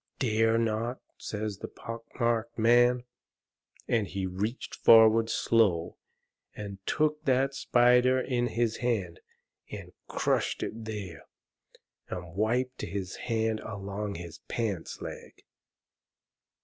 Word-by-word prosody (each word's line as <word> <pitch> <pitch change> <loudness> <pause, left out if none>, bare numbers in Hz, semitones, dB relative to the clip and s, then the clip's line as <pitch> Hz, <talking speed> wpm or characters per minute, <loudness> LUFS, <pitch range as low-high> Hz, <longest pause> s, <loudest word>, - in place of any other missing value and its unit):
"DARE 115 -2 +2
not?" 115 +2 -1 0.2
says 105 -2 -4
the - - -5
pock 115 0 -8
marked 115 -1 0
man. 120 +2 +4 0.8
And 115 -4 +1
he 95 0 -3
reached 100 +6 -3
forward 115 0 +6
slow 95 -8 +2 0.6
and 100 -2 -7
took 150 0 +1
that 135 +1 +2
spider 125 0 +4
in 125 -1 0
his 115 -1 0
hand, 100 -9 -1 0.5
and - - -8 0.2
crushed - - 0
it 110 0 -5
there, 105 -5 -6 0.8
and 85 -2 -6
wiped 125 +6 0
his 95 -2 -4
hand 110 -1 +1
along 100 0 -5
his 85 -1 -8
pants 105 -8 -3
leg. - - -9
115 Hz, 110 wpm, -29 LUFS, 100-120 Hz, 0.8 s, forward